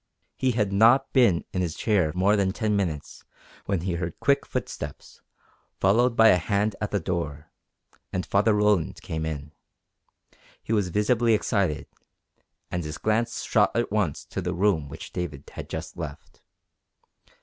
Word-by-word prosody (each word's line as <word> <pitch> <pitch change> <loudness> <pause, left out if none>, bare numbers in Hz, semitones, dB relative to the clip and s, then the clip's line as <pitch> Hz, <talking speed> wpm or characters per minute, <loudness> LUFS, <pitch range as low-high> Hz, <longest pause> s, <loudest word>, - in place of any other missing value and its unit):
He 130 -1 +1
had 105 -4 0
not 120 +7 +5
been 115 -11 +4
in 90 - 0
his 85 -3 -2
chair 95 -8 +1
more 95 +3 +3
than 100 -2 +1
ten 105 -1 0
minutes 85 -7 -3 0.4
when 95 -4 0
he 90 0 -2
heard 85 -1 -4
quick 140 0 +2
footsteps, - - -6 0.6
followed 115 +5 +3
by 115 -1 +7
a 90 - +6
hand 100 +4 0
at 105 - -1
the 100 - 0
door, 80 -4 -4 0.6
and 90 0 -2
Father 105 +2 +3
Roland 105 -5 +2
came 80 0 -3
in. 75 -1 -5 1.1
He 115 - -2
was 100 -4 +1
visibly 115 +4 +2
excited, 100 -7 0 0.9
and 90 -1 -2
his 75 0 -5
glance 115 +2 0
shot 105 -2 +2
at 120 -2 0
once 100 -9 -1
to 95 - -5
the 90 0 -2
room 85 -6 +1
which - - -9
David 80 -6 -5
had - - -8
just - - -6
left. 70 -1 -8
100 Hz, 160 wpm, -26 LUFS, 85-110 Hz, 1.1 s, by